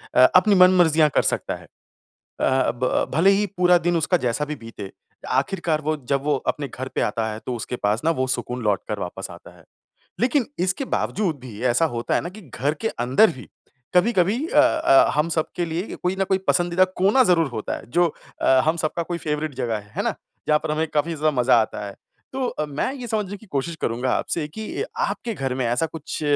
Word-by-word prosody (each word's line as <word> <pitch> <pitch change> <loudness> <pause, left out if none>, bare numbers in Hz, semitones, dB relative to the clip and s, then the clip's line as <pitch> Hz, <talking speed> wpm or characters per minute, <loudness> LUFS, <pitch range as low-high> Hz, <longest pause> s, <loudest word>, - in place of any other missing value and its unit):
अ, - - +4 0.2
अपनी 200 +2 +6
मनमर्ज़ियाँ 175 -4 +5
कर - - +5
सकता - - -3
है। - - -13
अ, - - -22 1.1
ब 125 +1 0
भले 185 +5 +5
ही 205 +1 +2
पूरा 180 0 +5
दिन 175 0 +2
उसका 165 +3 +2
जैसा 120 +5 0
भी 150 +1 -4
बीते 105 -4 -8 0.5
आखिरकार 165 0 -2
वो 155 +1 -1
जब 140 -1 +1
वो 150 -1 +2 0.2
अपने 145 -2 -6
घर 130 +2 -6
पे - - 0
आता 110 +1 0
है 110 - -6
तो 125 - -2
उसके 120 +2 -5
पास 105 0 0
ना 165 - +3
वो 130 - +2
सुकून 125 +1 -5
लौट 105 -3 +1
कर - - -2
वापस - - -6
आता - - -13
है। - - -19 0.6
लेकिन 250 +1 +2
इसके 185 +9 0
बावज़ूद 185 -8 -1
भी 115 -5 -10
ऐसा 165 +8 +3
होता 115 0 -1
है - - +2
ना, - - -5
कि 200 +4 -11
घर 145 -1 -2
के 225 - 0
अंदर 130 - +3
ही 125 - -11 0.5
कभी-कभी 190 +2 +3
अ 300 - +2
अ, 325 +2 +4
हम 150 +2 +1
सबके 165 +2 -1
लिए 170 +5 -4
कोई 180 +1 0
न - - +3
कोई 190 -1 +2
पसंदीदा 175 +1 +3 0.2
कोना 205 +8 +5
ज़रूर 170 - +3
होता 110 -4 -4
है - - -11
जो 175 +6 +3 0.4
अ, - - +1 0.2
हम 160 +2 +2
सबका 165 +1 -1
कोई 170 +1 -4
फ़ेवरेट 150 -2 -3
जगह 115 -2 -2
है। 105 0 -15
है - - 0
ना? - - 0 0.3
जहाँ 150 - +5
पर 155 - -2
हमें 155 +1 0
काफ़ी 160 +3 +1
ज़्यादा 155 0 +1
मज़ा 120 -1 +5
आता 105 - -5
है। 100 - -8 0.4
तो 260 -1 -1
अ, 150 - -3
मैं 145 - -2
ये 250 -3 -7
समझने 210 -3 -2
की 220 - -17
कोशिश 160 0 -3
करूँगा 120 +3 -1
आपसे 165 -3 -1
कि 220 - -5
आपके 240 - -2
घर 135 -4 -2
में 130 -1 -1
ऐसा 120 +7 +1
कुछ 160 -1 -7
160 Hz, 220 wpm, -23 LUFS, 130-185 Hz, 1.1 s, अपनी